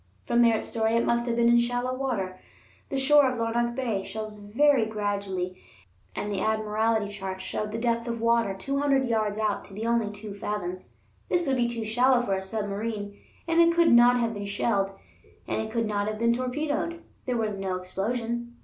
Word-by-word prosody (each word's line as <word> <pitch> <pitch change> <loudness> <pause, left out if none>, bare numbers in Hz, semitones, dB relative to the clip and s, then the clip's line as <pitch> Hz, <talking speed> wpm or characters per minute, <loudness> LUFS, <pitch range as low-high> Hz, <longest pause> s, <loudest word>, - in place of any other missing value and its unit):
From 240 0 +3
Merritt's 230 -2 +3
story, 225 0 0
it 230 - +2
must 235 0 +1
have 235 - 0
been 235 0 +3
in 235 0 +6
shallow 245 +1 -1
water. 205 -9 -3 0.5
The 275 - -2
shore 280 0 +5
of 250 - -4
Larnac 235 +1 0
Bay 230 -7 -1
shelves 215 +2 -6
very 235 +3 +3
gradually, 200 -4 -3 0.5
and 210 - -3
the 195 -2 -1
Admiralty 220 0 +1
charts 190 -2 -6
showed 210 +2 -3
the 225 - -3
depth 235 0 0
of 235 -1 -3
water 230 -3 +2
two 275 +8 -2
hundred 275 -2 +2
yards 215 -3 0
out 215 -2 0
to 195 - -13
be 220 +2 -4
only 230 -2 +1
two 205 0 -8
fathoms; 200 -3 -5 0.4
this 350 -1 +1
would 270 -2 +1
be 240 -1 +2
too 235 -2 -3
shallow 245 +3 +3
for 200 - -1
a 190 - -1
submarine. 205 +1 -3 0.3
And 335 0 +4
it 335 0 +4
could 340 -1 +5
not 245 +1 +6
have 230 -1 0
been 205 -1 -5
shelled, 200 -1 0 0.6
and - - -1
it 220 - -5
could 230 0 0
not 205 -1 -1
have 215 0 -2
been 235 +1 +3
torpedoed; 295 +7 -2 0.2
there 250 -1 0
was 220 -2 -1
no 195 -2 -3
explosion. 235 +6 -3
225 Hz, 200 wpm, -27 LUFS, 205-240 Hz, 0.6 s, in